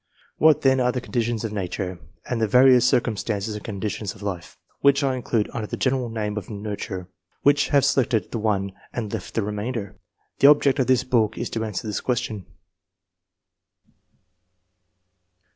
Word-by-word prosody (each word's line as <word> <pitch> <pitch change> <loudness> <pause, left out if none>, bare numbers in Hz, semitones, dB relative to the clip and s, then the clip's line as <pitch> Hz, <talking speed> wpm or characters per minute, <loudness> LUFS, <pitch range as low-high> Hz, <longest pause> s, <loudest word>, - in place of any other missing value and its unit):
What 155 -1 +5
then 130 -1 +4
are 125 0 +2
the 125 - -2
conditions 120 -2 -2
of 110 -2 -3
nature, 95 -2 -4 0.3
and 120 -2 -2
the 110 - +2
various 125 +2 +6
circumstances 110 -3 0
and 105 - -7
conditions 105 -1 -4
of 100 - -12
life, 95 -5 -5
— - - -39
which 140 +1 +4
I 135 -1 +1
include 115 -3 -1
under 110 -3 -3
the - - -5
general 130 -2 0
name 105 -2 -3
of 105 - -5
nurture, 100 -3 -5 0.2
— - - -45
which 145 +1 +4
have 140 -2 +3
selected 130 -4 +1
that 115 - -2
one 100 -3 0 0.2
and 110 -4 -4
left - - -6
the 115 - +1
remainder? 105 -1 -4 0.4
The 140 - +7
object 145 -1 +4
of 130 - +2
this 130 -1 +3
book 115 -5 +1
is 120 - -4
to 110 - -2
answer 110 +2 -4
this 105 -1 -3
question. 120 -6 -2
115 Hz, 175 wpm, -24 LUFS, 105-130 Hz, 0.4 s, The